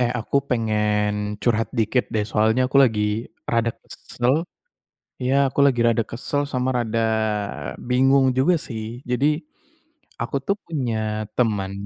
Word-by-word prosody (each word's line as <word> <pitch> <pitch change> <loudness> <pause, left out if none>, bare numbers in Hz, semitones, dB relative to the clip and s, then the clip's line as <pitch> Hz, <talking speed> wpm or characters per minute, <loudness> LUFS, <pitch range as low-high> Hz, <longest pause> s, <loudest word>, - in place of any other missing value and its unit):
Eh, 120 - +2
aku 125 - -1
pengen 105 -2 0
curhat 115 -2 +1
dikit 115 +3 +2
deh. 105 -1 +1
Soalnya 110 +4 +2
aku 135 - 0
lagi 110 -4 0 0.5
rada 115 0 +2
kesel. 125 +2 -2 0.9
Iya, 130 +2 +1
aku 135 - -11
lagi 125 -4 +2
rada 115 0 +3
kesel 140 +4 -2
sama 125 -1 0
rada 115 -1 -1 0.9
bingung 135 +2 +4
juga 160 +8 +4
sih. 110 -4 -5 0.3
Jadi 125 +4 +2 0.9
aku 120 +4 -2
tuh 200 - +1
punya 110 -8 -2
teman, 105 -5 0
115 Hz, 130 wpm, -23 LUFS, 110-130 Hz, 0.9 s, bingung